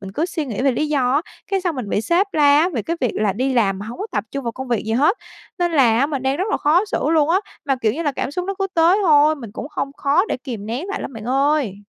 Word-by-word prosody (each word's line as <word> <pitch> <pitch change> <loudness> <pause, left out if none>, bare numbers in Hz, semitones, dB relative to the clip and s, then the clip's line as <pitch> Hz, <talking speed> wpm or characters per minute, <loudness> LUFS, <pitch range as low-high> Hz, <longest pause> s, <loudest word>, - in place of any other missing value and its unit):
mình 195 -1 -8
cứ 315 +8 -1
suy 325 -3 -3
nghĩ 235 -1 -3
về 275 - +4
lý 305 +5 -1
do 260 -4 +1
á, 285 - +3 0.3
cái 390 -1 +1
xong 355 -3 -1
mình 245 -5 -4
bị 205 - 0
sếp 345 - +2
la 290 -1 +5
á, 335 +4 +3
về 255 - -3
cái 335 +8 -3
việc 250 - +1
là 210 -2 +1
đi 260 +7 -1
làm 195 -5 +2
mà 205 - -7
hông 235 - -8
có 410 - -3
tập - - -1
trung 275 -1 -5
vào 235 - -2
công 260 +2 -7
việc 235 -3 0
gì 220 - -1
hết. 295 - +3 0.4
Nên 350 -1 0
là 245 -7 +4
á 275 - +3
mình 280 -4 -3
đang 265 +1 0
rất 365 - -1
là - - +2
khó 335 +7 +3
xử 315 -6 -1
luôn 315 -2 +3
á, 375 +3 +3 0.3
mà, 270 -1 +1
kiểu 225 -4 0
như 320 +8 -3
là, 290 -3 0
cảm - - -3
xúc 360 +5 -3
nó 390 +1 -3
cứ 390 - 0
tới 335 +4 +4
thôi, 305 -3 +5
mình 235 -8 -9
cũng - - -6
hông 275 - -3
khó 285 +5 +2
để - - -1
kìm 240 -6 -7
nén 245 - -4
lại 400 - -3
lắm - - -6
bạn 220 -2 -8
ơi. 270 -4 +1
280 Hz, 315 wpm, -20 LUFS, 240-325 Hz, 0.4 s, la